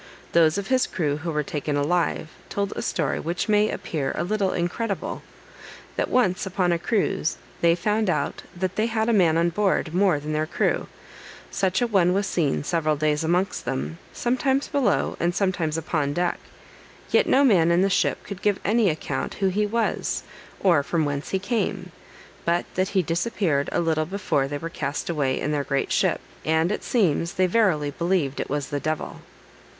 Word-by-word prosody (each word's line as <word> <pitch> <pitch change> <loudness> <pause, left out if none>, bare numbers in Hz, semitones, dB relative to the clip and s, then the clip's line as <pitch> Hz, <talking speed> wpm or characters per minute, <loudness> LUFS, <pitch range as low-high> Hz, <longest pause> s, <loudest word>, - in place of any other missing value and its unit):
Those 165 0 +4
of 200 - -2
his 260 -1 +3
crew 150 -5 -1
who 165 +2 -5
were 150 -1 0
taken 150 0 -3
alive, 160 +1 0 0.2
told 200 -1 -2
a - - -3
story - - -1
which 170 +6 -2
may 210 0 +3
appear 140 -5 -3
a 170 - -1
little 195 0 0
incredible. 195 +4 -2 0.7
That - - -1
once, 190 -7 +2
upon 185 -1 +1
a 170 - +1
cruise, 195 -3 0 0.2
they 170 0 +5
found 210 +4 0
out 165 - -1
that 185 +1 -3
they 220 +1 +2
had 220 0 0
a - - +3
man 170 -6 +4
on 170 +1 +3
board 185 -3 0
more 180 -4 +3
than 150 +1 -4
their 155 +1 0
crew; - - 0 0.6
such 190 +5 +1
a - - +3
one 185 -5 +3
was 200 +1 +1
seen 155 -7 0
several 155 -1 +1
days 150 +1 0
amongst 180 +4 0
them, 75 +5 -3
sometimes 265 +3 0
below, 280 -4 +1
and 175 +1 0
sometimes 185 -6 0
upon 150 -3 -1
deck, 175 +2 0 0.7
yet - - +4
no 275 - +5
man 185 -11 +5
in 170 +2 +4
the - - +4
ship 195 - +1
could 200 -2 -8
give 205 -2 +1
any 220 -1 +3
account 150 -4 -3
who 195 -1 +1
he 210 +3 +1
was, 230 +2 -1 0.4
or 175 -7 +4
from 160 +2 0
whence 145 0 -3
he 190 - +1
came; 190 -3 -2 0.5
but 170 +1 +1
that 185 +1 0
he 185 - +4
disappeared 165 -3 0
a - - +1
little 160 -2 +1
before 185 -7 0
they 145 +1 -3
were 165 - -5
cast 150 0 -3
away 140 -5 0
in 150 - -1
their 145 -1 0
great 140 -1 -1
ship, - - +2 0.2
and, 160 +3 +2
it - - -2
seems, 170 - +1
they 185 - +3
verily 180 -8 +2
believed 170 -4 0
it - - -3
was 145 -1 -2
the 145 - -2
devil. 155 +1 -3
175 Hz, 190 wpm, -24 LUFS, 155-200 Hz, 0.7 s, they